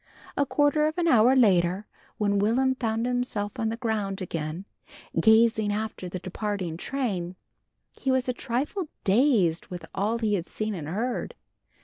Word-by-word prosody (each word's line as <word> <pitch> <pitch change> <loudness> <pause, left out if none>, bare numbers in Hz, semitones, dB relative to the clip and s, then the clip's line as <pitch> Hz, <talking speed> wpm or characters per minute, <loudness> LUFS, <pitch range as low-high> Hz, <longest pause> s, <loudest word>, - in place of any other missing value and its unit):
A 280 - +1
quarter 295 +2 +3
of 310 - -3
an 345 -1 +1
hour 245 -2 +5
later 190 -4 +3 0.3
when 205 -1 +1
Will'm 250 +6 +2
found 225 -2 -1
himself 245 -5 -2
on 225 - 0
the 225 - -3
ground 215 -5 -2
again, 165 0 -4 0.5
gazing 220 -1 +4
after 210 -3 -3
the 185 - -4
departing 185 -2 -3
train, 185 -4 -3 0.6
he 270 - -4
was 260 0 +2
a 250 - +1
trifle 275 +10 -2 0.2
dazed 195 - +3
with 180 -2 -7
all 215 +4 0
he 220 -2 0
had 180 -4 -1
seen 215 0 -3
and 160 -6 -5
heard. 225 +9 -2
220 Hz, 155 wpm, -26 LUFS, 190-250 Hz, 0.6 s, hour